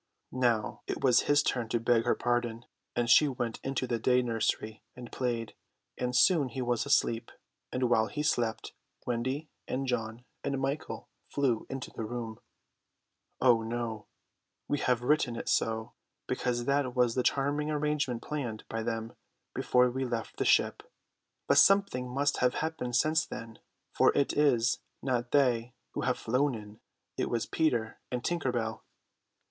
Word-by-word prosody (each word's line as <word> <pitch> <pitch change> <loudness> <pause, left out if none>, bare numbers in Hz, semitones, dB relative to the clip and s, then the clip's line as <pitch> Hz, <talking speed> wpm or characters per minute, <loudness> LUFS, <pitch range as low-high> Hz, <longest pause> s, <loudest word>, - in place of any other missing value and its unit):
Now 120 -4 0
it - - -4
was 125 -3 +6
his 145 0 +5
turn 120 -5 -1
to 120 - +1
beg 115 0 +2
her - - +3
pardon; 120 -1 -1 0.3
and 120 -1 +1
she 150 +5 +7
went 120 -4 -3
into 135 -1 -1
the 120 -2 -1
day 125 +2 +3
nursery 110 -2 -1
and 125 -1 -10
played, 120 -4 -2 0.4
and 125 0 -2
soon 145 0 +4
he 130 - -6
was 120 +2 0
asleep; 115 -4 +2 0.4
and 125 0 +1
while 110 -2 +3
he 150 - -3
slept, 120 -6 0 0.3
Wendy 130 +5 -2 0.2
and 135 +1 -2
John 120 -1 -3 0.2
and 140 -1 -1
Michael 135 +3 -3 0.2
flew 130 -6 0
into 135 -1 -5
the - - -5
room. 115 -1 -5 1.0
Oh 120 -3 +5
no. 115 -1 -4 0.6
We 145 - 0
have 125 -1 +1
written 125 -3 +2
it - - -6
so, 110 0 0 0.3
because 120 -1 -1
that 140 -2 +1
was 125 -2 +3
the 125 - +1
charming 145 +3 +1
arrangement 150 -5 -1
planned 125 -8 -4
by 115 - -3
them 115 0 -3 0.4
before 125 0 +3
we 130 +2 -2
left 120 -3 -4
the - - 0
ship; - - +3 0.6
but - - +5
something 195 -11 +4
must 140 +3 +1
have 125 0 +2
happened 155 -6 -2
since 155 +4 +3
then, 115 -1 -8 0.3
for - - +5
it 140 - +2
is 125 -6 +3 0.2
not 120 -2 0
they 125 -4 +2 0.2
who - - -3
have - - 0
flown 130 +3 +1
in, 105 -1 -10 0.4
it - - 0
is 115 -1 0
Peter 120 -9 0
and 125 -1 -3
Tinker 170 -7 0
Bell. 110 -2 -3
125 Hz, 160 wpm, -30 LUFS, 115-135 Hz, 1.0 s, she